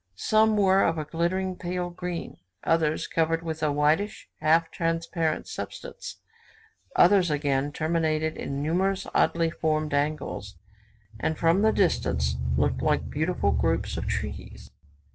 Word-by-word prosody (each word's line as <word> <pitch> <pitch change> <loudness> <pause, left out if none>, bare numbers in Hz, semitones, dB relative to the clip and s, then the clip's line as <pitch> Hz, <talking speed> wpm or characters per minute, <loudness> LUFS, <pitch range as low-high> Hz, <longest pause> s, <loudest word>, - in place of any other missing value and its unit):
Some 215 - +3
were 195 -1 +4
of 165 - +1
a 155 - -3
glittering 180 +4 -1
pale 180 0 -3
green; 175 -1 -5 0.3
others 160 -2 +1
covered 165 0 0
with 160 -1 -4
a 150 -2 +2
whitish, 150 +8 +1
half 165 +1 +3
transparent 165 -2 -1
substance; - - -7 0.8
others 185 -1 +5
again 145 -1 0
terminated 155 0 0
in 140 +1 -4
numerous 190 +5 0
oddly 165 -1 +2
formed 155 -2 -1
angles, 145 -8 -2 0.6
and 155 +6 -1
from 165 +4 +3
the 220 +1 +4
distance 190 -5 +1 0.2
looked 75 0 +1
like - - 0
beautiful - - 0
groups - - 0
of - - -4
trees. - - -5
165 Hz, 130 wpm, -26 LUFS, 155-180 Hz, 0.8 s, others